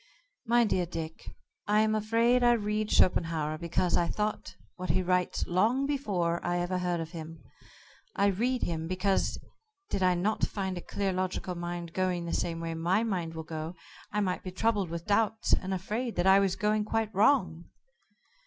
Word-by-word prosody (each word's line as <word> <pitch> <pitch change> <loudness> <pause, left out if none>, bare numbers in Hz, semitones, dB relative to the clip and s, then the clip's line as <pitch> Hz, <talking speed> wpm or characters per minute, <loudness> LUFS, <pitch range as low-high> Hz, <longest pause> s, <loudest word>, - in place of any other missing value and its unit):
"My 240 +1 +5
dear 185 -5 +1
Dick, 165 -1 -6 0.4
I 210 +1 +4
am 215 0 +2
afraid 230 +3 +2
I 240 0 +6
read 210 -1 -1
Schopenhauer 160 -3 +2
because 170 +1 0
I 175 -1 +2
thought 210 +4 -3 0.2
what 185 0 -6
he 185 - +2
writes 180 0 0
long 220 +10 +2
before 195 -12 -1
I 175 0 0
ever 175 +1 -1
heard 175 -1 -1
of 165 0 -5
him. 160 -3 -8 0.7
I 200 - +2
read 240 +6 +1
him 165 -1 -2
because 185 +2 0 0.5
did - - -1
I 180 -1 +4
not 200 +5 -1
find 190 -2 -1
a 175 - -5
clear 195 +2 -2
logical 185 0 -2
mind 175 -1 -5
going 185 -2 0
the 170 - -4
same 165 -1 -1
way 165 0 -3
my 175 +6 +1
mind 175 -7 -2
will 160 - -5
go, 160 +2 -6 0.4
I 210 - 0
might 185 -2 -1
be 185 - -6
troubled 200 -1 0
with 170 0 -5
doubts, 215 +1 +1
and 190 - +1
afraid 215 +6 -2
that 175 - 0
I 190 +1 +7
was 195 -2 +1
going 210 +1 +1
quite 220 0 -1
wrong." 185 - +3
185 Hz, 180 wpm, -29 LUFS, 170-210 Hz, 0.7 s, I